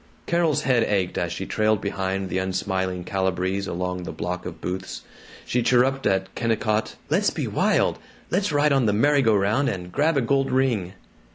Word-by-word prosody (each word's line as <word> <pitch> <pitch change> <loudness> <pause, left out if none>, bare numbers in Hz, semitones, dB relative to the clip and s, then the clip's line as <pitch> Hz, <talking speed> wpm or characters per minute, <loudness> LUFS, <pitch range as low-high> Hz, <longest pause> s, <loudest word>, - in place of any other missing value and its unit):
Carol's 170 -4 +1
head 125 -3 +3
ached 95 -3 0
as 85 -1 -2
she 85 - -4
trailed 110 -1 +1
behind 95 -1 -2
the 95 - 0
unsmiling 95 -1 -2
Calibrees 95 +1 -1
along 90 +1 -3
the 90 - -6
block 90 +1 -4
of - - -8
booths. 90 +1 -5 0.4
She 125 - 0
chirruped 130 +3 +2
at 95 0 0
Kennicott, 110 -2 -1 0.2
"Let's - - +3
be - - -3
wild! - - +1 0.3
Let's 195 0 +1
ride 145 0 +3
on 135 -4 +3
the 105 - +2
merry 140 +7 +3
go 110 -4 +3
round 105 +8 +2
and 90 -5 -5
grab 150 - +2
a - - +3
gold 135 +3 +1
ring!" 120 -9 +1
105 Hz, 180 wpm, -24 LUFS, 95-130 Hz, 0.4 s, head